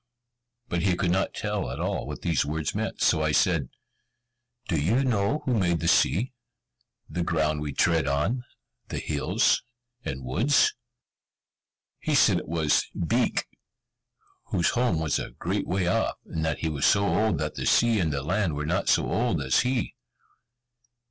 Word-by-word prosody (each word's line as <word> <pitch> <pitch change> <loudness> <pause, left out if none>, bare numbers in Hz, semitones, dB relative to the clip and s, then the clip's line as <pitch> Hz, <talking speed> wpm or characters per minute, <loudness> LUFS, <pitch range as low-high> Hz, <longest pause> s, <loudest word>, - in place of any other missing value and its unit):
But 85 -5 -1
he 95 -1 +2
could 90 -1 0
not 95 +2 0
tell - - -2
at - - -6
all - - -2
what 75 - -7
these 85 -5 +1
words 75 0 -3
meant. - - -3
So 80 - +3
I 80 0 +1
said, 80 -6 +2 1.0
"Do 80 -6 0
you 115 - +2
know 120 +4 0
who 130 - +1
made 90 -6 +1
the - - -2
sea, 120 - +2 0.7
the 90 - -3
ground 80 -3 0
we 75 -1 -3
tread 80 +1 +2
on, 85 - 0 0.4
the - - -5
hills, 75 -2 +1 0.4
and 65 -1 -5
woods?" 120 - +3 1.3
He - - -1
said - - +5
it - - -10
was 80 -2 +1
Beek, - - 0 1.0
whose 85 - +1
home 120 -9 +1
was 80 -2 0
a - - -5
great 90 +9 -3
way 95 0 0
off, 90 - +1
and 80 - -4
that 80 -2 -1
he 80 - 0
was 75 -2 +1
so 100 0 +3
old 100 +1 +1
that 75 +1 -3
the - - -3
sea 115 -2 +4
and 80 -4 +1
the 70 -1 -2
land 90 0 0
were 75 +1 -3
not 90 +5 0
so - - +3
old 115 -8 0
as 65 -2 +2
he. 125 -2 0
85 Hz, 170 wpm, -26 LUFS, 75-100 Hz, 1.3 s, said